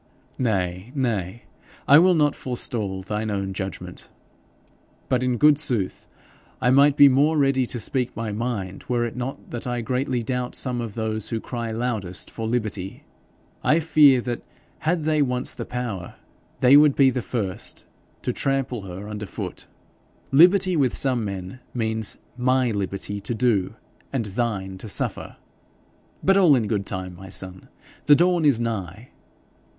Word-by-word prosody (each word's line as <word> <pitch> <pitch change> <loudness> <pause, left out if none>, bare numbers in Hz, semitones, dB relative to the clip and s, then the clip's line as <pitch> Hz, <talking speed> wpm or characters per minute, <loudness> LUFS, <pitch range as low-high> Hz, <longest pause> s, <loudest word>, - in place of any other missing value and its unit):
'Nay, 95 -3 -1
nay, 115 -5 -2 0.4
I 145 - +8
will 180 +1 +5
not 150 -2 +3
forestall 105 -6 -3
thine 105 +3 -3
own 100 -2 -2
judgment. 95 -2 -7 1.0
But, 130 -1 +2
in 125 -1 0
good 150 +3 +5
sooth, 115 -10 -2 0.5
I 125 - +2
might 140 +2 +5
be 145 - +9
more 145 +4 +3
ready 135 -3 +2
to 120 - -4
speak 125 +3 -2
my 115 -2 -3
mind, 105 -4 -4
were 120 -1 +1
it 115 - -5
not 125 +2 -6
that 120 +1 -5
I 120 -1 -2
greatly 125 0 -1
doubt 125 +1 -3
some 125 -2 -2
of 115 -4 -6
those 110 -2 -3
who 115 - -2
cry 120 0 -5
loudest 110 -6 -3
for 115 -1 -4
liberty. 110 -5 -3 0.6
I 155 - +4
fear 150 -5 +5
that 120 -1 -4 0.4
had 160 +1 0
they 155 -1 +2
once 125 -2 0
the - - -6
power, 115 -8 -5 0.5
they 130 +2 +7
would 150 -1 +6
be 135 -2 +5
the 125 - -2
first 105 -6 -4 0.4
to - - -1
trample 135 -4 -1
her 95 +3 -7
under 105 -1 -6
foot. - - -7 0.6
Liberty 180 +5 +6
with 135 -6 +1
some 130 -4 +1
men 100 +3 -6 0.2
means 110 -2 -1 0.2
MY 130 0 +2
liberty 100 0 -4
to 110 +4 -3
do, 110 -4 +1 0.4
and 130 -5 -1
THINE 95 -3 -3
to 110 - -8
suffer. - - -2 0.9
But 195 +1 +4
all 175 -7 +6
in 120 -4 +1
good 100 -2 -2
time, 95 -1 -5
my 95 +2 -11
son! 95 0 -6 0.4
The 145 - +8
dawn 175 0 +3
is 140 -6 +4
nigh.' 110 -1 -4
120 Hz, 160 wpm, -24 LUFS, 100-135 Hz, 1.0 s, be